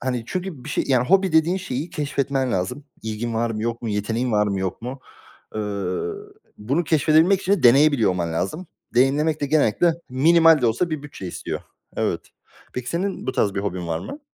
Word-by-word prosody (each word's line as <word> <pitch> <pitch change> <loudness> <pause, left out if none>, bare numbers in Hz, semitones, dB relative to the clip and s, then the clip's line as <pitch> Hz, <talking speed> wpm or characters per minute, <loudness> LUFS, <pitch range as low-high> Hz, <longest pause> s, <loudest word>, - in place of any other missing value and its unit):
Hani, 125 -2 -2
çünkü 180 -8 -5
bir - - -8
şey - - 0
yani, 125 -2 +2
hobi 190 -2 +4
dediğin 160 +3 +3
şeyi 160 -3 -4
keşfetmen 140 -4 -1
lazım. 95 +10 -2 0.2
İlgin 110 +1 -3
var 115 +1 0
mı, 110 -1 -3
yok 115 +1 -3
mu? 115 - -3
Yeteneğin 110 +4 -1
var 105 0 +3
mı, 100 -1 -1
yok 95 +4 -3
mu? 130 +2 -6 0.5
Eee, 110 - -2 1.0
bunu 135 +11 0
keşfedebilmek 160 +5 +4
için 195 +1 0
de 200 - +1
deneyebiliyor 135 -2 +5
olman 85 -2 -2
lazım. 125 - -3 0.3
Deneyimlemek 145 +5 +2
de 145 - 0
genellikle 155 +3 +3
minimal 160 +3 +5
de 120 - +2
olsa 140 +10 0
bir 155 -2 -3
bütçe 140 -10 -8
istiyor. - - -5 0.4
Evet. - - 0 0.5
Peki 125 -1 -5
senin 190 +4 -2
bu 130 - -1
tarz 100 -6 +1
bir 100 - -1
hobin 90 -3 -3
var 80 -1 -1
mı? 290 - -8
130 Hz, 190 wpm, -23 LUFS, 110-160 Hz, 1.0 s, deneyebiliyor